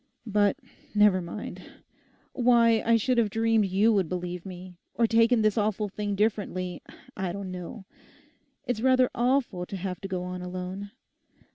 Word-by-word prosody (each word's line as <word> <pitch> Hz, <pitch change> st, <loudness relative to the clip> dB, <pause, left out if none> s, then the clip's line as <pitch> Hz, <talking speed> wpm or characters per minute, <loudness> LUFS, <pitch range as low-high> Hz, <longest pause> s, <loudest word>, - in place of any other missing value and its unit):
But 205 Hz, -2 st, +2 dB, 0.4 s
never 205 Hz, -3 st, +5 dB
mind; 175 Hz, +5 st, -7 dB, 0.7 s
why 235 Hz, -3 st, +4 dB
I 230 Hz, 0 st, +4 dB
should 245 Hz, +2 st, +1 dB
have 220 Hz, -3 st, +2 dB
dreamed 225 Hz, -1 st, +2 dB
you 200 Hz, +5 st, +3 dB
would 190 Hz, -6 st, +1 dB
believe 180 Hz, 0 st, -4 dB
me; 180 Hz, -1 st, -10 dB, 0.2 s
or 235 Hz, -, +3 dB
taken 230 Hz, 0 st, +4 dB
this 215 Hz, 0 st, +2 dB
awful 210 Hz, 0 st, 0 dB
thing 205 Hz, +1 st, -3 dB
differently, 195 Hz, -4 st, -1 dB, 0.3 s
I 190 Hz, -2 st, -2 dB
don't 195 Hz, 0 st, -6 dB
know. 185 Hz, +3 st, -8 dB, 0.8 s
It's 245 Hz, -3 st, -2 dB
rather 255 Hz, 0 st, +4 dB
awful 240 Hz, -7 st, 0 dB
to 195 Hz, -, -5 dB
have 185 Hz, 0 st, -5 dB
to 195 Hz, -, -5 dB
go 185 Hz, -2 st, -3 dB
on 180 Hz, 0 st, -5 dB
alone. 185 Hz, +2 st, -6 dB
205 Hz, 155 wpm, -27 LUFS, 185-225 Hz, 0.8 s, never